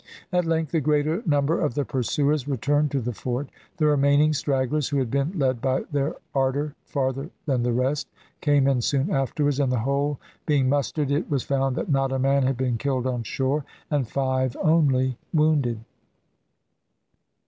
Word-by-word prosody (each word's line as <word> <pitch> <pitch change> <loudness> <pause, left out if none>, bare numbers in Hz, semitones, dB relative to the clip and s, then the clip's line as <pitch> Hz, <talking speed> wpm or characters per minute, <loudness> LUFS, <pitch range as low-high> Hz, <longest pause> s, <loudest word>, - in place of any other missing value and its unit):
At 180 -1 +2
length 160 -2 0
the 165 - +1
greater 150 +5 +1
number 145 +1 +2
of 145 -6 0
the 145 - 0
pursuers 140 +3 0
returned 145 +2 +1
to 140 -1 -1
the 120 +1 -3
fort. 125 +5 -3 0.3
The 155 - +2
remaining 145 +1 +4
stragglers, 140 0 0
who 145 - 0
had 130 -4 -1
been 140 +7 -1
led 130 -5 +1
by 130 0 0
their 145 +1 0 0.2
ardour 140 +2 0
farther 135 +1 -2 0.2
than 135 -5 +1
the 120 0 +1
rest, 130 +4 0 0.3
came 145 -3 +3
in 135 -3 +2
soon 140 - 0
afterwards, 145 0 0
and 135 -3 +2
the 125 - +1
whole 140 +3 0 0.3
being 140 -4 +3
mustered, 145 +1 0
it 145 +5 0
was 140 -4 0
found 135 -1 0
that 170 - -2
not 135 -1 +2
a 135 - 0
man 135 +1 +2
had 130 -1 +1
been 125 -3 -1
killed 130 -2 -1
on 125 -2 -1
shore 135 +5 -1 0.3
and 140 -5 +1
five 130 -1 -1
only 135 -6 +3 0.2
wounded. 150 -7 +2
140 Hz, 175 wpm, -25 LUFS, 130-150 Hz, 0.3 s, remaining